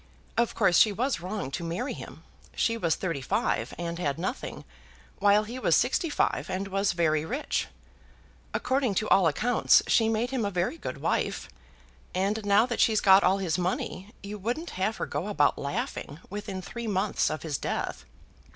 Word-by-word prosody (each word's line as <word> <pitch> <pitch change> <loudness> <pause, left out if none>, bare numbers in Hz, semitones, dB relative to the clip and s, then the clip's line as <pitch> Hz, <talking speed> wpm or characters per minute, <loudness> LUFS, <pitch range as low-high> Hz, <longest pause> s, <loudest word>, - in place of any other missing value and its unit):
Of 235 0 +1
course 190 -5 +4
she 215 - +6
was 245 +2 -1
wrong 185 -6 -4
to 140 +5 -4
marry 175 +11 -3
him. - - -10 0.3
She 230 - +1
was 170 -8 +1
thirty 165 -7 -3
five, 115 -2 0
and 170 0 -4
had 140 -5 -1
nothing, 180 +3 -4 0.5
while 205 +1 +5
he 235 +4 -6
was - - +3
sixty 335 - +1
five, 290 - 0
and 190 +1 -3
was 195 0 +1
very 155 -3 +1
rich. 255 - -2 0.8
According 260 -6 0
to 215 - 0
all 190 -3 +5
accounts 225 +10 +3
she 225 -1 +3
made 225 +3 0
him 260 -4 -1
a 200 - 0
very 185 - -1
good - - -6
wife, - - -1 0.7
and 200 +4 0
now 205 +2 +4
that 240 -2 -3
she's 220 -2 +4
got 195 0 +6
all 190 +2 +4
his 180 -4 -1
money, 185 +2 -3
you 205 +1 -6
wouldn't 245 - -3
have 195 +4 -1
her - - -2
go 150 +7 -3
about 155 -9 +2
laughing 140 +1 -4
within 200 -2 -5
three 235 +3 -6
months 200 0 +1
of 155 - -4
his 150 -4 -2
death." 60 - -3
195 Hz, 180 wpm, -28 LUFS, 175-225 Hz, 0.8 s, she